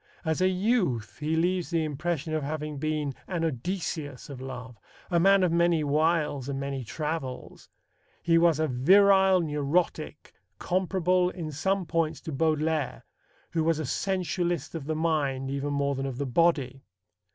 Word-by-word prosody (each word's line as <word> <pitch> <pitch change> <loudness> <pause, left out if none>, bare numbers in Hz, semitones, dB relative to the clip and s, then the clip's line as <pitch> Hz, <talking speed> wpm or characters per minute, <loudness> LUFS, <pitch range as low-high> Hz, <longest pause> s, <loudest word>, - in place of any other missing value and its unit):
As 160 +2 0
a 185 - +5
youth 185 - 0
he 155 +1 -1
leaves 175 +2 0
the 165 -2 +1
impression 155 +1 -2
of 155 - 0
having 150 0 -4
been 150 -2 -1
an 175 -3 -2
Odysseus 150 -2 -4
of 130 -2 -8
love, 125 -3 -8 0.3
a 170 - +3
man 195 +2 +5
of 180 - +2
many 170 -2 +3
wiles 150 -2 +1
and 135 -1 -3
many 140 -1 -3
travels. 150 +1 -5 0.5
He 165 -1 +4
was 170 -3 +4
a 155 - +2
virile 190 +7 +5
neurotic, 150 0 -1 0.2
comparable 180 0 +1
in 165 -4 -6
some 190 +6 0
points 160 -1 -1
to 160 - -6
Baudelaire, 155 0 0 0.5
who 160 - 0
was 165 -1 +2
a 155 - -3
sensualist 175 0 -1
of 160 -4 -5
the 155 +1 -2
mind 145 -5 0
even 140 +1 -2
more 140 0 0
than 135 0 -3
of 130 -2 -5
the 140 - -2
body. 135 -2 +1
155 Hz, 160 wpm, -27 LUFS, 140-175 Hz, 0.5 s, a